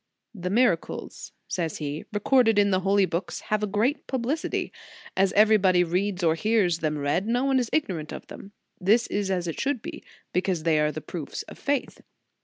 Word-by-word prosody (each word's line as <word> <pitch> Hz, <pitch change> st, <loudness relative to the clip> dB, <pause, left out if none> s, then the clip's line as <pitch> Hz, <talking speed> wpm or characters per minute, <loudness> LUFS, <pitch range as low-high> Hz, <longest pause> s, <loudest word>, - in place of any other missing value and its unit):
"The 180 Hz, -4 st, -4 dB
miracles," 205 Hz, -5 st, 0 dB, 0.2 s
says 165 Hz, -4 st, -2 dB
he, 150 Hz, 0 st, -5 dB
"recorded 225 Hz, +1 st, +3 dB
in 200 Hz, 0 st, +4 dB
the 185 Hz, -, +3 dB
holy 195 Hz, +1 st, +3 dB
books, 175 Hz, 0 st, -3 dB
have 215 Hz, 0 st, +2 dB
a 210 Hz, -, 0 dB
great 215 Hz, +9 st, 0 dB
publicity. 265 Hz, +5 st, -2 dB, 0.4 s
As 195 Hz, 0 st, +3 dB
everybody 200 Hz, -4 st, +5 dB
reads 180 Hz, +2 st, -1 dB
or 160 Hz, -1 st, +4 dB
hears 180 Hz, -2 st, +1 dB
them 155 Hz, -1 st, -1 dB
read, 145 Hz, +8 st, 0 dB
no 245 Hz, +3 st, +1 dB
one 270 Hz, -1 st, +3 dB
is 240 Hz, -3 st, -1 dB
ignorant 175 Hz, -, -1 dB
of -, -, -7 dB
them. 195 Hz, -, -11 dB, 0.3 s
This 215 Hz, +5 st, +3 dB
is 200 Hz, -1 st, -2 dB
as 180 Hz, -2 st, -1 dB
it 165 Hz, -, -4 dB
should 270 Hz, -4 st, -1 dB
be, -, -, -7 dB, 0.3 s
because 180 Hz, -3 st, 0 dB
they 160 Hz, -2 st, +3 dB
are 150 Hz, 0 st, +2 dB
the 155 Hz, -, -6 dB
proofs 160 Hz, -3 st, -6 dB
of -, -, -13 dB
faith. 280 Hz, -1 st, -2 dB
195 Hz, 190 wpm, -26 LUFS, 170-220 Hz, 0.4 s, everybody